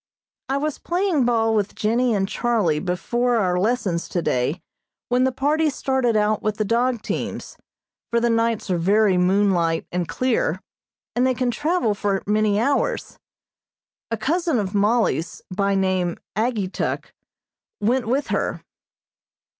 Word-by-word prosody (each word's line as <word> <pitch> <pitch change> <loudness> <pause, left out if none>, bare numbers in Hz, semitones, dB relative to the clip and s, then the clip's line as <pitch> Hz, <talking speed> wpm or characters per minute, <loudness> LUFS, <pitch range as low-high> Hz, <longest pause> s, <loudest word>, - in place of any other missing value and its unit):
I 270 - +1
was 300 +1 -2
playing 350 -6 +1
ball 225 -2 +2
with 210 -2 0
Jennie 235 +2 +1
and 195 -1 0
Charlie 215 -9 +1
before 235 +8 0
our 180 -5 +1
lessons 195 -5 0
today 150 -2 0 0.5
when 250 +1 +3
the 260 - +2
party 300 +5 +1
started 260 -4 0
out 210 0 +1
with 215 0 -1
the 215 - 0
dog 235 +1 +1
teams, - - -4 0.5
for 235 - +2
the 235 - +1
nights 230 -3 0
are 175 - +1
very 200 +2 +3
moonlight 180 -3 +2
and 175 -1 -1
clear, 460 - 0 0.6
and 250 +2 +3
they 260 - +1
can 250 -1 0
travel 295 -4 0
for 200 -1 -1
many 210 0 +2
hours. 285 - -1 0.9
A 230 - -1
cousin 320 - 0
of 200 -2 -2
Mollie's, 205 -6 +1
by 200 0 +1
name 185 -2 0 0.2
Ageetuk, 215 -4 -2 0.7
went 235 +3 +1
with 265 +5 0
her. - - -1
220 Hz, 140 wpm, -22 LUFS, 195-255 Hz, 0.9 s, when